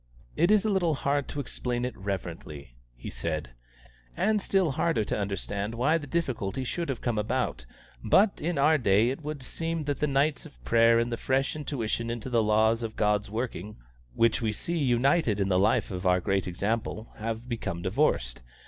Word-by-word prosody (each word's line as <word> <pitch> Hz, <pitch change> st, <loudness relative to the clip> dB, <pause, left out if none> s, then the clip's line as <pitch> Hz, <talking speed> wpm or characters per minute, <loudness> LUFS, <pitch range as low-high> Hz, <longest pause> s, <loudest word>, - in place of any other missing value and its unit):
"It 170 Hz, +4 st, +3 dB
is 215 Hz, 0 st, +4 dB
a -, -, +2 dB
little 175 Hz, -5 st, +2 dB
hard 140 Hz, +1 st, 0 dB
to 145 Hz, -, -5 dB
explain 125 Hz, -2 st, -3 dB
it 125 Hz, -, -4 dB
reverently," 85 Hz, -, -6 dB, 0.2 s
he -, -, -8 dB
said, 75 Hz, -6 st, -3 dB, 0.7 s
"and 215 Hz, 0 st, +2 dB
still 190 Hz, -6 st, +2 dB
harder 150 Hz, -4 st, +1 dB
to -, -, -2 dB
understand 100 Hz, +2 st, -3 dB
why 145 Hz, +8 st, +2 dB
the 145 Hz, -, -8 dB
difficulty 130 Hz, -7 st, -2 dB
should 170 Hz, +6 st, -3 dB
have 135 Hz, -, -3 dB
come 120 Hz, -3 st, 0 dB
about, 105 Hz, -, -2 dB, 0.4 s
but 200 Hz, +1 st, +3 dB
in 170 Hz, 0 st, -1 dB
our 150 Hz, +2 st, +4 dB
day 110 Hz, +1 st, +3 dB
it 135 Hz, -, -6 dB
would 150 Hz, -2 st, -5 dB
seem 165 Hz, +3 st, -3 dB
that 145 Hz, -1 st, -2 dB
the 150 Hz, -, +1 dB
nights 140 Hz, +2 st, +1 dB
of -, -, -15 dB
prayer 115 Hz, 0 st, +5 dB
and 120 Hz, +1 st, 0 dB
the 115 Hz, -, -2 dB
fresh 135 Hz, +4 st, 0 dB
intuition 115 Hz, -6 st, -2 dB
into 120 Hz, +2 st, -4 dB
the 115 Hz, -2 st, +3 dB
laws 110 Hz, +2 st, +3 dB
of 110 Hz, -1 st, -4 dB
God's 105 Hz, -1 st, +1 dB
working, 110 Hz, -2 st, -4 dB, 0.4 s
which 115 Hz, 0 st, +3 dB
we 110 Hz, -2 st, +1 dB
see 170 Hz, +10 st, -3 dB
united 130 Hz, -2 st, +2 dB
in 100 Hz, -1 st, +1 dB
the 90 Hz, -1 st, +3 dB
life 100 Hz, -, +2 dB
of 90 Hz, 0 st, -2 dB
our 90 Hz, 0 st, +4 dB
great 95 Hz, +1 st, 0 dB
Example, 110 Hz, +4 st, -3 dB
have 115 Hz, +2 st, -4 dB
become 110 Hz, -8 st, -4 dB
divorced. 80 Hz, -, 0 dB
115 Hz, 190 wpm, -28 LUFS, 100-145 Hz, 0.7 s, prayer